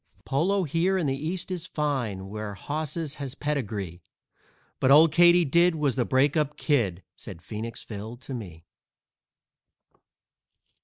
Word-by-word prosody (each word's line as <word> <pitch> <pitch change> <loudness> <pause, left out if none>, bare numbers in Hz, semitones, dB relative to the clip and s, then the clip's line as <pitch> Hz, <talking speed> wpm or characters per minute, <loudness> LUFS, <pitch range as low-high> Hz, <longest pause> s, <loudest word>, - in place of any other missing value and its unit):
_"Polo 180 +8 +1
here 170 +6 +1
in 175 - 0
the 135 -1 0
East 170 +6 -4
is 180 -3 -4
fine, 125 -11 -2
where 105 0 -6
hosses 155 - -3
has 135 -1 -4
pedigree, 105 - -3 0.8
But 130 - +2
Old 150 +3 +7
Katydid 175 0 +5
was 150 -4 +1
the 125 -2 +1
break 135 +3 +2
up 150 -2 0
Kid," 105 - 0
said 85 -5 -10
Phoenix 115 +1 -6
Phil 110 +2 -7
to 130 +2 -9
me. 90 -9 -8
140 Hz, 135 wpm, -26 LUFS, 110-160 Hz, 0.8 s, Old